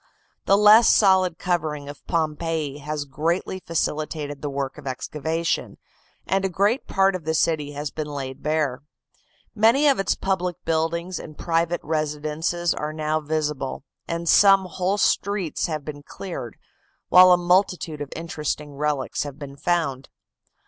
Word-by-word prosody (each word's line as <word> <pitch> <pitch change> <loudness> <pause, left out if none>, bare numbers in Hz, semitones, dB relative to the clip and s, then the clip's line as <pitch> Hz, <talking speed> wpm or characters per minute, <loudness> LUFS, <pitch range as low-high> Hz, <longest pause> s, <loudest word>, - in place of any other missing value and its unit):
The 195 - +5
less 210 +3 +7
solid 185 -4 +4
covering 155 -6 -2
of 145 - -10
Pompeii 160 -2 -1
has 150 0 -4
greatly 165 +6 -2
facilitated 155 -4 -3
the 145 - -3
work 135 -1 -4
of - - -10
excavation, 160 +5 -2 0.5
and 195 0 0
a 195 - +1
great 205 +7 +1
part 195 0 +2
of 180 - -5
the 160 +1 -1
city 150 -3 0
has 145 0 -4
been 155 -1 -4
laid 135 -3 -6
bare. 150 -4 -1 0.7
Many 230 +7 +4
of 275 -5 +3
its 195 - +1
public 180 -2 -1
buildings 165 +2 -1
and 155 - -10
private 170 0 0
residences 155 +2 -1
are 150 0 -4
now 155 0 -1
visible, 150 -4 -3 0.2
and 170 0 -3
some 195 +1 +6
whole 185 +3 -1
streets 200 -4 0
have 155 -3 -4
been 145 -1 -7
cleared, 145 - -7 0.5
while 185 0 +8
a 180 - +7
multitude 175 -3 +1
of 145 - -6
interesting 150 -3 -4
relics 145 -1 -2
have 145 -2 -5
been 140 -2 -9
found. 140 -5 -1
160 Hz, 150 wpm, -23 LUFS, 150-180 Hz, 0.7 s, while